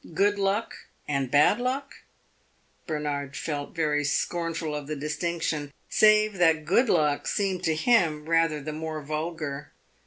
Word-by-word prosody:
Good 205 +3 +2
luck 200 +3 -2 0.2
and 140 -3 -1
bad 150 - +4
luck? 265 +3 -3 0.9
Bernard 145 -3 -3
felt 145 -1 -4
very 150 -3 +1
scornful 165 +2 -1
of 150 -1 -5
the 155 - -3
distinction, 150 0 -2 0.2
save 215 -2 +4
that 160 -3 +3
good 230 +8 +3
luck 150 -4 +2
seemed 195 -3 -1
to 160 - +2
him 160 -5 +2
rather 165 -2 +2
the 150 +2 -6
more 155 -1 -5
vulgar. 155 -1 -4
160 Hz, 135 wpm, -26 LUFS, 150-185 Hz, 0.9 s, bad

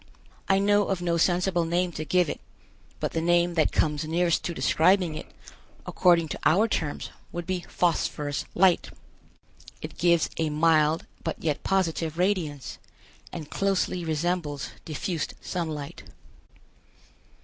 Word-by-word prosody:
I 195 - +5
know 205 +1 +3
of 190 -2 -1
no 170 -1 +1
sensible 175 +1 +2
name 175 +2 0
to 155 - -5
give 180 +2 +2
it, - - -5 0.6
but - - -2
the 165 - -1
name 175 +1 +3
that 160 -2 +2
comes 150 -2 +1
nearest 170 +2 +1
to 175 - -2
describing 180 +1 +3
it, 155 - -7 0.6
according 170 -2 +3
to - - -5
our 205 +7 +4
terms, 155 -9 -3 0.2
would 175 0 -5
be 185 -1 -3
Phosphorous 150 -4 -1
Light. 185 -1 +4 0.9
It - - -9
gives 170 -1 +3
a 160 -1 +1
mild 155 0 +3 0.2
but 165 - -2
yet 150 -3 -2
positive 165 -4 0
radiance, 175 - -1 0.5
and 155 -4 -7
closely 195 -2 0
resembles 160 -2 -2 0.2
diffused 160 0 -3
sunlight. 155 -5 -4
170 Hz, 135 wpm, -26 LUFS, 155-180 Hz, 0.9 s, I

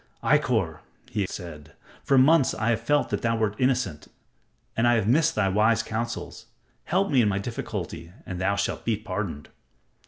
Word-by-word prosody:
"Ikkor," - - +1 0.3
he 105 -4 -1
said, 85 -7 -9 0.3
"for 135 - +3
months 140 +2 +5
have - - -7
I 115 +1 +3
felt 145 +7 0
that - - -1
thou 115 -1 +1
wert 110 -2 0
innocent, 125 - 0 0.7
and 115 +1 +2
I 120 - +5
have 110 -3 0
missed 150 +7 +3
thy 110 -3 +2
wise 110 +3 +3
counsels. 115 +1 -5 0.4
Help 190 +2 +1
me 130 -3 +5
in 105 - +3
my 95 - 0
difficulty 100 -5 -5
and 90 -1 -5
thou 100 +2 +1
shalt 100 0 -2
be 115 -2 0
pardoned." 95 -8 -5
110 Hz, 175 wpm, -26 LUFS, 95-120 Hz, 0.7 s, months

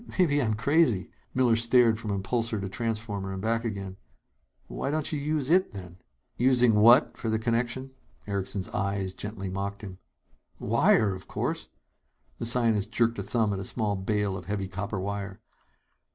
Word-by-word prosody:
"Maybe 150 -6 +3
I'm 110 -4 0
crazy!" 125 - +2 0.2
Miller 125 -3 +4
stared 115 -1 +4
from 110 - -5
impulsor 110 +3 -1
to 95 - -3
transformer 105 -1 -3
and 95 - -5
back 115 +3 0
again. 100 -4 -5 0.7
"Why - - -4
don't 155 0 -1
you 150 - -1
use 150 0 -1
it, 185 -6 +3
then?" 90 -3 -9 0.4
"Using 125 -2 +4
what 115 +6 +6
for 115 - -3
the 110 - +1
connection?" 120 +3 -1 0.3
Erickson's 100 -1 -3
eyes 100 -1 -2
gently 105 -1 -6
mocked 100 +2 -4
him. 95 -2 -8 0.6
"Wire, 100 -3 +3
of 95 0 -9
course!" - - -3 0.7
The 115 - -2
scientist 115 -4 +1
jerked 115 -2 +1
a - - -1
thumb 105 +1 0
at 95 - -3
a - - -4
small 105 +1 -1
bale 100 0 -1
of 90 -2 -7
heavy 100 0 -2
copper 100 +2 -4
wire. 100 0 -4
110 Hz, 165 wpm, -27 LUFS, 100-120 Hz, 0.7 s, what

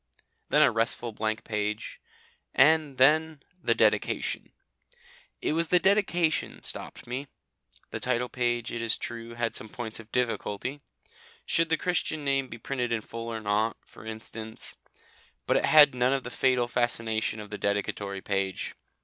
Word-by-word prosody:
Then - - +5
a - - +5
restful 115 +1 0
blank 110 0 -2
page, 105 0 -3 0.5
and 150 -1 +4
then 155 +2 +4 0.2
the 115 -6 +2
Dedication. 110 -2 +1 0.9
It - - +2
was 165 +1 +1
the 180 - +5
dedication 175 -4 +1
stopped - - -2
me. 130 +4 -4 0.6
The - - -3
title 125 0 0
page, 120 -1 -1
it 115 - -3
is 115 -1 +4
true, 115 0 -6
had 115 -1 -1
some 110 - -5
points 110 -2 -6
of 115 -1 -13
difficulty. 125 +2 -2 0.6
Should 165 0 +2
the 165 - +3
Christian 155 -4 -1
name 135 -1 +1
be 115 - -8
printed 125 +1 -3
in 115 -2 0
full 115 +1 -7
or 115 -1 -4
not, 105 +2 +1
for - - -15
instance; 110 0 -7 0.7
but - - +2
it - - +2
had 150 -3 +8
none 125 +1 +2
of 135 -1 -1
the 125 - -7
fatal 125 -2 +2
fascination 115 -3 0
of 105 -1 -9
the 105 - -5
dedicatory 100 -1 -2
page. 95 -1 -2
120 Hz, 160 wpm, -28 LUFS, 110-135 Hz, 0.9 s, had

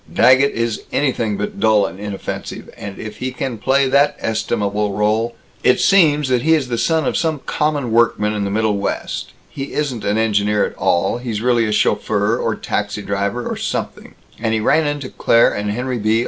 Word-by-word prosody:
Daggett 130 +4 +4
is 115 -1 -2
anything 120 -7 0
but 205 -1 -4
dull 110 - +4
and 95 - -7
inoffensive, 100 -1 -6
and 100 -1 -8
if 110 -1 -8
he 130 +1 -3
can 125 -2 -4
play 135 +4 +2
that 140 +2 +3
estimable 105 -2 -1
rôle! 110 +3 +1 0.3
It 125 - +4
seems 150 -7 +4
that 125 -2 +2
he 160 +4 +4
is 135 -5 -2
the 120 - -1
son 160 -1 +1
of - - -1
some 160 -2 0
common 145 -5 -1
workman 115 -2 +2
in 105 -1 -2
the 100 - -2
Middlewest; 105 -1 -1 0.2
he 135 0 -7
isn't 135 -7 -2
an 105 +1 0
engineer 105 -1 +2
at - - -6
all; 85 +7 +1
he's 120 -4 -3
really 120 -2 +2
a - - -1
chauffeur 105 0 +1
or 115 - 0
a - - -8
taxi 105 0 -3
driver 100 +5 -2
or - - -3
something; - - -4 0.2
and 110 0 0
he - - 0
ran 150 +8 +2
into 145 -2 -3
Claire 115 -2 +3
and 105 0 -3
Henry 125 +3 -2
B. 110 +1 +2
115 Hz, 195 wpm, -19 LUFS, 105-130 Hz, 0.3 s, Daggett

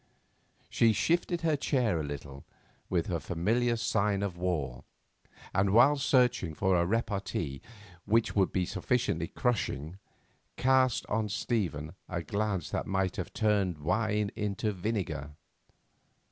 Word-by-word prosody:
She 115 -1 +3
shifted 175 - +1
her 160 -2 +2
chair 125 - +1
a - - -2
little, 70 -1 -7 0.5
with 85 -3 +1
her 90 - -1
a - - -6
familiar 115 - +1
sign 105 -3 +1
of 95 -3 -2
war, 85 -9 -2 0.7
and 95 +1 +2
while 125 +6 +7
searching 125 - +2
for 95 +1 +2
a 85 0 +2
repartee 100 - -2 0.4
which 115 +2 +2
would 95 -3 +3
be 90 -2 0
sufficiently 115 -8 -1
crushing, 95 - -2 0.6
cast 130 -2 +3
on 105 0 -1
Stephen 90 - -2 0.2
a 85 -2 -3
glance 100 +1 -2
that - - -2
might 95 -1 0
have - - -4
turned 100 -6 +1
wine 105 +6 0
into 105 +1 -1
vinegar. 90 -8 -3
100 Hz, 130 wpm, -30 LUFS, 85-115 Hz, 0.7 s, while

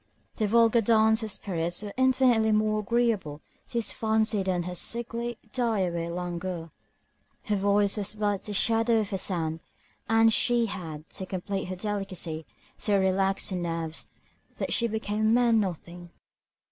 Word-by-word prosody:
Their 215 - +1
vulgar 230 +1 +4
dance 220 0 +4
of 220 - -3
spirits 175 -2 -2
were 205 -1 -6
infinitely 255 -4 +3
more 215 0 +2
agreeable 215 -9 0 0.3
to - - -14
his 230 -3 +1
fancy 220 -2 +1
than 185 -2 -1
her 180 +1 -5
sickly, 235 +4 -2 0.2
die 230 -5 +1
away 170 -2 -2
languor. 175 -1 -4 0.7
Her 210 - 0
voice 200 +1 +2
was 205 0 -3
but 205 -2 0
the 210 - -4
shadow 225 +2 +3
of 205 -1 -5
a 190 - 0
sound, 165 -4 -1 0.5
and 225 0 +5
she 240 0 +3
had, 160 -7 -6
to 190 - -6
complete 195 +1 -3
her 185 - -5
delicacy, 185 -5 -4 0.3
so 205 -2 +2
relaxed 190 +1 +1
her - - -1
nerves, 165 -2 -4 0.5
that - - -2
she 235 - +3
became 215 -1 -3
a - - +1
mere 235 +2 +4
nothing. 175 -4 -2
205 Hz, 160 wpm, -27 LUFS, 180-225 Hz, 0.7 s, and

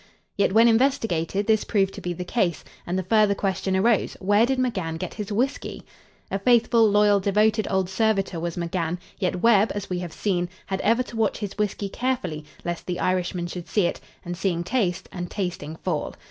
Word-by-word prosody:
Yet, 200 - +2
when 225 +3 +6
investigated, 225 - +1
this 220 -1 +3
proved 195 -3 +1
to - - -8
be 180 - -3
the 180 +1 -5
case, 180 -7 0 0.2
and 180 +2 -1
the 190 - -1
further 210 +1 +3
question 190 -1 -1
arose, 220 +2 +2
where 205 +4 +3
did 265 0 0
McGann 190 -11 -1
get - - -5
his 210 -1 -6
whiskey? 245 +7 -2 0.5
A 195 - -1
faithful, 230 0 +4
loyal 205 0 +4
devoted 210 +2 +2
old 190 -1 +1
servitor 195 -2 0
was 170 0 -3
McGann, 170 0 -2 0.2
yet 180 -2 -1
Webb, 225 -2 +5
as 200 -2 -5
we 180 - -1
have 175 -2 -5
seen, 180 -3 -1 0.2
had 190 -1 -3
ever 230 +3 +3
to 240 - -11
watch 220 -2 +1
his 205 -3 -5
whiskey 205 -1 -1
carefully 195 -10 -2 0.2
lest 175 -1 -4
the 180 -1 -2
Irishman 180 -1 0
should 175 0 -6
see 205 -4 +2
it, 175 - -1 0.3
and 175 0 -4
seeing 175 -2 -1
taste, 185 -3 -1
and 175 -1 -5
tasting 175 -6 -4
fall. 165 -2 -3
195 Hz, 195 wpm, -24 LUFS, 175-220 Hz, 0.5 s, when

